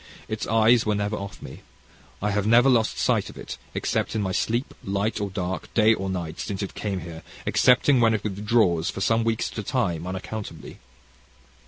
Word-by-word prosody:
Its - - -4
eyes 115 +1 +4
were 105 -1 0
never 105 +1 -1
off 100 -1 -7
me. - - -10 0.6
I 105 - +1
have 105 0 0
never 120 +4 +6
lost 115 -3 +2
sight - - +1
of - - -12
it, - - -7 0.2
except - - -1
in 110 - 0
my 95 - -1
sleep, 115 +7 -1
light 100 +3 -1
or 100 - -2
dark, 90 -2 -4
day 110 0 +5
or 95 -3 -3
night, 85 -4 -4
since 100 0 -3
it 100 - -5
came 100 -3 -3
here, 80 0 -8 0.2
excepting 130 +1 +4
when 115 -1 +4
it 110 - -4
withdraws 105 -5 +1
for - - -5
some 115 +3 +2
weeks 115 0 -1
at - - -6
a - - -3
time, 90 -8 -1
unaccountably. 95 -2 -6
105 Hz, 195 wpm, -25 LUFS, 95-115 Hz, 0.6 s, never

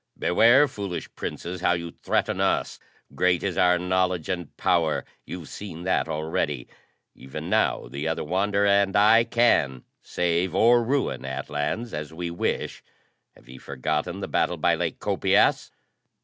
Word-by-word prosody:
"Beware, 120 +10 +5
foolish 100 -8 -6
Princes, 90 +1 -6
how 90 - +3
you 85 -1 -4
threaten - - -1
us. - - 0 0.3
Great 90 -1 +1
is 95 -3 -2
our 90 0 +4
knowledge 90 -2 0
and 90 -4 -4
power: 85 -4 +1 0.2
you've 85 -5 -8
seen 85 0 -8
that 95 - 0
already. 75 -4 -2 0.5
Even 65 - -8
now, - - +1
the 70 +3 -5
other 80 - -2
Wanderer 100 +5 0
and 100 -1 +3
I 110 +3 +6
can 115 - +2 0.2
save 85 +1 -1
or 120 +3 +5
ruin 135 +4 -1
Atlans, 75 - -3
as 75 0 -5
we 85 +1 -5
wish! 85 - -3 0.5
Have - - -21
ye 65 0 -12
forgotten 75 +7 -3
the - - -3
battle - - 0
by - - +2
Lake - - -2
Copias?" - - +2
90 Hz, 150 wpm, -25 LUFS, 80-100 Hz, 0.5 s, I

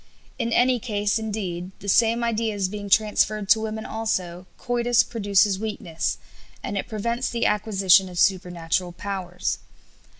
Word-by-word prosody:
In 235 -1 -1
any 250 +1 +3
case, 210 -2 -1
indeed, 190 -5 -4
the 200 - -11
same 230 +3 +3
ideas 220 -4 0
being 205 0 -6
transferred 215 0 +2
to 220 +1 +6
women 220 0 -4
also, 185 -5 -3
coitus 240 0 +2
produces 205 -3 +2
weakness, 205 -6 -3 0.5
and 205 - -4
it 195 - -2
prevents 235 +3 -2
the 235 0 -1
acquisition 195 -3 +3
of 180 - -9
supernatural 175 -1 0
powers. 180 -2 -4
205 Hz, 135 wpm, -24 LUFS, 185-225 Hz, 0.5 s, to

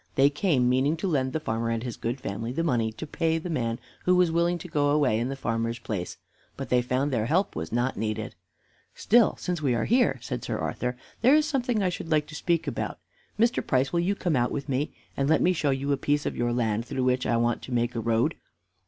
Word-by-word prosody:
They 140 +1 +5
came 145 -5 +2
meaning 130 +5 +2
to 195 - -2
lend 135 -6 +1
the 160 - -1
farmer 115 -5 -2
and 115 0 -1
his 120 -3 -4
good 120 +3 -3
family 115 +1 -4
the 165 +6 -1
money 120 -8 +1
to 110 +8 -7
pay 160 +2 0
the 170 +2 -4
man 115 -6 -1 0.3
who 180 - +4
was 180 -2 +4
willing 170 +1 +2
to 175 - -9
go 145 -3 +1
away 145 -7 +3
in 120 +2 -1
the 135 - -3
farmer's 115 -2 -2
place. 105 -6 -5 0.4
But - - -5
they 125 -1 +4
found 130 +4 0
their 110 -2 0
help 185 +8 +1
was - - -4
not 120 +3 0
needed. 110 0 -3 0.6
"Still, 230 0 +4
since 180 -3 -3
we 130 -5 +1
are 115 - 0
here," 235 - +3
said - - -5
Sir - - -2
Arthur, 125 0 -3 0.2
"there 255 +6 +6
is 305 0 +4
something 245 -8 0
I 185 - +2
should 170 -2 -6
like 150 -1 +2
to - - -10
speak 170 +1 0
about. - - -3 0.4
Mr. 235 +3 +2
Price, 130 +3 +1
will 170 - +2
you 185 +4 +1
come 175 -5 0
out 120 -1 +1
with 140 - -4
me, 140 +2 -1 0.2
and 140 +1 0
let 160 - +4
me 185 - +3
show 155 -4 0
you 135 +1 0
a 140 - +2
piece 145 +1 0
of - - -2
your 120 0 0
land 115 -2 0
through 130 - -2
which 125 0 +1
I 120 - +2
want 120 0 +1
to - - -9
make 120 0 0
a 115 - -2
road. 115 +7 +1
135 Hz, 250 wpm, -27 LUFS, 120-165 Hz, 0.6 s, there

